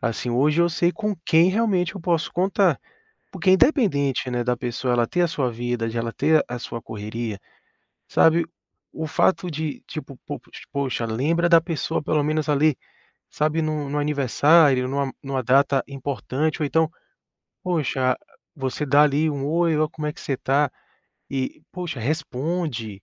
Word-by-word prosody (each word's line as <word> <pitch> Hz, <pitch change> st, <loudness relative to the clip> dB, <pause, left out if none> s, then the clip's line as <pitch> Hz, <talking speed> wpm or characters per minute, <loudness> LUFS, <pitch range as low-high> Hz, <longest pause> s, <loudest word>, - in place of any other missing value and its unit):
Assim, 115 Hz, +2 st, -2 dB
hoje 150 Hz, +7 st, +3 dB
eu 170 Hz, -, +3 dB
sei 170 Hz, +1 st, +1 dB
com 210 Hz, +2 st, -2 dB
quem 165 Hz, +3 st, +5 dB
realmente 195 Hz, -4 st, +1 dB
eu 195 Hz, -, -7 dB
posso 170 Hz, -1 st, 0 dB
contar, 190 Hz, -2 st, +2 dB, 0.5 s
porque 190 Hz, -, 0 dB
independente, 185 Hz, -, +2 dB
né, 120 Hz, 0 st, -1 dB
da 125 Hz, 0 st, +1 dB
pessoa 125 Hz, +1 st, -2 dB
ela 120 Hz, -1 st, +3 dB
ter 175 Hz, -, 0 dB
a 175 Hz, -, +3 dB
sua 140 Hz, -6 st, -1 dB
vida, 120 Hz, 0 st, -2 dB
de 115 Hz, -, -5 dB
ela 115 Hz, 0 st, -2 dB
ter 155 Hz, +1 st, +3 dB
a 125 Hz, -, -4 dB
sua 115 Hz, -1 st, -6 dB
correria, 110 Hz, 0 st, -5 dB, 0.7 s
sabe, 165 Hz, +1 st, +4 dB, 0.5 s
o 160 Hz, -, -4 dB
fato 180 Hz, +3 st, +1 dB
de 155 Hz, -1 st, -4 dB
tipo, 150 Hz, -4 st, -8 dB
po 145 Hz, -, -4 dB, 0.3 s
poxa, 135 Hz, -5 st, -2 dB
lembra 155 Hz, +10 st, +1 dB
da 165 Hz, -1 st, +7 dB
pessoa 165 Hz, -4 st, -2 dB
pelo 150 Hz, 0 st, +1 dB
menos 155 Hz, +1 st, 0 dB
ali, 145 Hz, 0 st, +3 dB, 0.5 s
sabe, 155 Hz, +2 st, 0 dB
num 155 Hz, -2 st, -2 dB
num 145 Hz, +1 st, -1 dB
aniversário, 145 Hz, -1 st, +4 dB
numa 140 Hz, 0 st, -1 dB
numa 135 Hz, -2 st, -2 dB
data 135 Hz, +2 st, +3 dB
importante, 140 Hz, +3 st, -2 dB
ou -, -, +2 dB
então, 160 Hz, +2 st, +2 dB, 0.7 s
poxa, 135 Hz, -7 st, 0 dB, 0.4 s
você 135 Hz, +1 st, -3 dB
dá 145 Hz, +2 st, +6 dB
ali 150 Hz, +2 st, +2 dB
um: 140 Hz, -1 st, -3 dB
"Oi. 165 Hz, +1 st, +2 dB
Ó 155 Hz, 0 st, +2 dB
como 150 Hz, 0 st, -6 dB
é 150 Hz, -, -3 dB
que -, -, -14 dB
você 135 Hz, -, -2 dB
tá?" 140 Hz, +2 st, +1 dB, 0.6 s
E 135 Hz, -1 st, -3 dB
poxa, 175 Hz, -7 st, -5 dB
responde, 135 Hz, -, -3 dB
145 Hz, 165 wpm, -23 LUFS, 130-165 Hz, 0.7 s, da